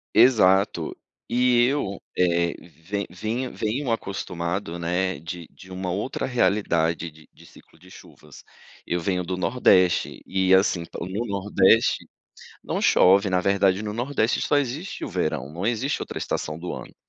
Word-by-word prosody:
Exato, 100 -7 +4 0.3
e 125 0 +3
eu, 130 -7 -1 0.2
eh, 85 -1 +2
ven 90 +5 -6
vinh 110 +8 -3
venho 120 +4 -2
acostumado, 90 -4 -3
né, 90 -1 -1
de 85 0 -7
de 95 -1 -15
uma 95 0 -4
outra 100 +8 -3
realidade 85 -8 +1
de 80 0 -19
de - - -18
ciclo 80 - -20
de 90 - -17
chuvas. - - -15 0.4
Eu 85 - -1
venho 90 +1 -1
do 90 +1 -3
Nordeste 90 -1 +2
e 95 0 +1
assim, 95 -3 +3
pro 90 - -7
Nordeste 100 +1 +2 0.6
não - - -2
chove, 100 +2 +5
na 90 -1 +1
verdade, 100 0 +2
no 105 -1 -4
Nordeste 120 0 0
só 145 - +1
existe 145 +6 -3
o - - -5
verão, 70 +4 -2
não 85 +6 -4
existe 120 +5 -1
outra - - -6
estação 75 +1 -3
do 90 - -5
ano. - - -8
95 Hz, 150 wpm, -24 LUFS, 85-110 Hz, 0.6 s, chove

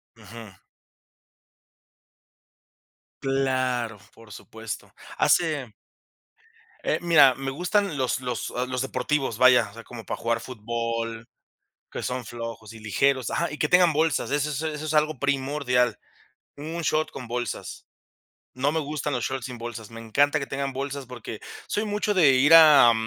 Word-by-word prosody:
Ujú. 110 -4 -12 2.7
Claro, 130 -4 0 0.2
por 115 -1 -16
supuesto. 110 +1 -8 0.3
Hace 150 -9 +2 1.1
Eh, - - 0
mira, 160 -6 +6
me 135 +1 -4
gustan 180 +2 0
los 130 -1 0
los 125 -2 -4 0.2
los 125 -1 -2
deportivos, 135 -2 -1
vaya, 125 -3 +5
o - - -19
sea, 115 +1 -11
como 115 -2 -10
para - - -4
jugar 115 0 0
fútbol 115 -1 -4 0.6
que - - -5
son 125 0 -3
flojos 115 -2 -7
y 115 - -11
ligeros, 130 +5 +1
ajá. - - -1
Y 150 - -6
que 150 - +1
tengan 180 0 +5
bolsas, 155 -2 0
eso 145 +1 0
es 150 0 -3
eso 155 -1 -4
es 155 - -2
algo 155 -2 +2
primordial, 135 -4 0 0.6
un 160 +4 -5
short 155 0 0
con 125 -3 -8
bolsas. 120 -1 -5 0.7
No 135 +3 +1
me 160 - 0
gustan 150 0 -3
los 125 - -2
shots 130 -2 -3
sin 125 -2 -7
bolsas, 115 -2 -7
me 115 0 -9
encanta 145 +7 +2
que 140 - -4
tengan 135 0 -3
bolsas 140 0 -5
porque 120 -3 -8 0.3
soy 210 - -1
mucho 210 0 0
de 160 -8 +6
ir 140 +5 +4
a 150 -7 +9
130 Hz, 150 wpm, -25 LUFS, 115-150 Hz, 2.7 s, a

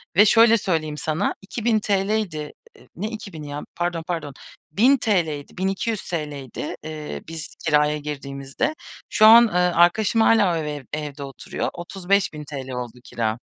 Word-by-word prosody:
ve 205 - +7
şöyle 230 +1 +6
söyleyeyim 155 -6 -1
sana: 160 +5 -1
₺2000'ydi 205 -6 -1 0.4
ne 210 +6 -3
2000'i 190 -9 -8
ya 145 +1 -5
pardon 175 -1 -2
pardon, 160 -5 -3 0.4
₺1000'ydi, 195 - +2
₺1200'ydi, 175 - -3 0.4
eee, 155 -1 -6
biz 165 -1 -8
kiraya 150 -1 +3
girdiğimizde. 140 - -4 0.3
Şu 215 - +4
an, 230 +2 +9
eee, 215 - -8
arkadaşım 180 +5 +3
hâlâ 210 -6 +4
o - - 0
eve 150 -3 -4
evde 150 -2 -5
oturuyor. 135 -1 -4
₺35.000 175 -7 -2
oldu 125 -1 -6
kira. 115 -1 -2
165 Hz, 125 wpm, -23 LUFS, 150-205 Hz, 0.4 s, an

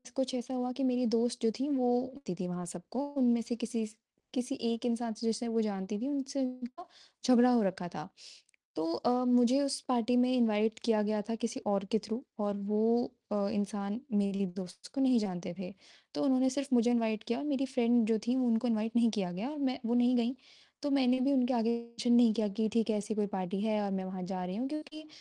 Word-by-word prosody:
कुछ 260 -1 -1
ऐसा 245 +1 -4
हुआ 250 0 -1
कि 275 - -1
मेरी 250 -1 +2
दोस्त 235 +1 +1
जो 225 - +3
थी 270 - 0
वो 250 -2 +2
होती 260 -8 -7
थी 180 - -4 0.2
सबको, 180 +8 -6 0.2
उनमें 240 -2 +4
से 235 +1 -3
किसी 230 -1 -2
स 215 - -17 0.4
किसी 255 +1 -2
एक 230 +1 -1
इंसान 235 -1 -1
से 230 +2 -7
जिसे 225 +2 -1
वो 225 0 +1
जानती 200 -1 -2
थी, 255 - -2
उनसे 280 -1 -2
उनका 255 +5 -5 0.4
झगड़ा 250 -1 +6
हो 240 - +4
रखा 185 -2 -2
था। 150 - -6 0.7
तो 155 - -1
अ, 235 - 0 0.2
मुझे 245 +2 +5
उस 275 0 0
पार्टी 245 -1 +2
में 250 +1 +4
इनवाइट 220 -1 +2
किया 220 -2 +3
गया 210 0 0
था 230 - 0
किसी 235 +3 -3
और 200 0 +1
के 220 - +3
थ्रू 220 +2 -3 0.2
और 205 -1 0 0.2
वो 210 +1 +2 0.5
अ, - - +1 0.2
इंसान 205 +1 -2
मेरी 200 -1 +1
दोस्त 185 -1 -8
को 270 - +1
नहीं 255 -3 +4
जानते 180 -4 -4
थे। 185 +1 -6 0.4
तो - - 0
उन्होंने 260 -1 +3
सिर्फ़ 275 +1 -2
मुझे 240 0 +4
इनवाइट 225 -2 +1
किया 235 0 0
और 290 - -4
मेरी 275 -2 0
फ्रेंड 240 -3 +3
जो 225 0 +3
थी 245 - +2
उनको 245 -2 +2
इनवाइट 225 0 0
नहीं 235 -1 +5
किया 195 -5 -2
गया 200 +9 -4
और 305 - -6
मैं 260 -2 0
वो 230 - +1
नहीं 245 +1 +4
गईं, 240 +1 +1 0.5
तो 290 -1 -1
मैंने 255 -2 +3
भी 275 +2 +3
उनके 255 -1 +2
आगे 230 -1 +2
मेंशन 235 0 -1
नहीं 240 -2 +6
किया 215 0 0
कि, 220 +2 -1
ठीक 230 -1 +1
है, 215 - +2
ऐसी 210 +2 -3
कोई 210 -1 +1
पार्टी 195 0 -3
है 215 -1 +1
और 200 - -2
मैं 190 -1 -2
वहाँ 185 -1 -5
जा 185 0 -4
रही 185 +2 -4
हूँ 255 +4 -2
क्योंकि 305 0 -7
235 Hz, 230 wpm, -32 LUFS, 210-255 Hz, 0.7 s, झगड़ा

